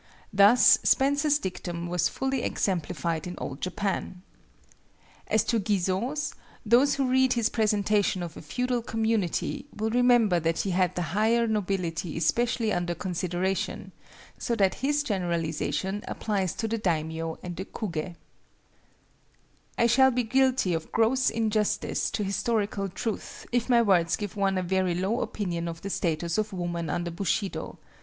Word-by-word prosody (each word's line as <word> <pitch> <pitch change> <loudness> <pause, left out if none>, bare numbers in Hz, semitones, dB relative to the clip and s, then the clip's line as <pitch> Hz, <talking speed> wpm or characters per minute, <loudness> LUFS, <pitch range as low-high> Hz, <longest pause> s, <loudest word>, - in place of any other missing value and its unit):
Thus 205 +5 +7
Spencer's 285 +2 +3
dictum 175 -6 -5
was 175 0 +1
fully 265 -1 -2
exemplified 170 -4 -2
in 180 - -6
Old 135 - -6
Japan. 185 -1 -3 1.0
As 220 0 +2
to 230 - +1
Guizot's, 205 +8 -1 0.3
those 250 +6 +4
who 275 -2 0
read 260 0 +3
his 235 -2 +1
presentation 210 -3 +1
of 170 -2 -7
a - - -9
feudal 250 +9 -1
community 225 - -1
will 220 +1 -1
remember 240 -6 +4
that 165 0 0
he 195 - -2
had 180 -1 +1
the 180 - -1
higher 225 +3 +3
nobility 185 -7 -2
especially 230 +6 +1
under 175 -1 -1
consideration, 180 +1 -2 0.5
so 235 - -1
that 195 -4 +3
his 290 +2 +1
generalization 180 - -2
applies 195 -5 -2
to 225 - -2
the 225 +1 -2
daimio 160 -3 -2
and 175 -1 -5
the 190 +3 -5
kugé. 175 -5 -5 1.6
I 235 - +3
shall 265 +3 +5
be 250 -1 0
guilty 260 -4 +2
of 165 -1 -4
gross 245 +4 +3
injustice 220 -2 0
to 210 - -2
historical 200 -1 -1
truth 220 +4 -5
if 245 +1 0
my 235 -1 +5
words 175 -5 +3
give 205 -1 -6
one 195 -1 +1
a 185 - 0
very 185 -1 0
low 195 +7 0
opinion 170 -5 -3
of 165 -1 -7
the 200 - -4
status 170 +2 -1
of 215 -1 -2
woman 170 -3 -3
under 170 +3 -2
Bushido. 195 +3 -2
200 Hz, 150 wpm, -27 LUFS, 175-230 Hz, 1.6 s, Thus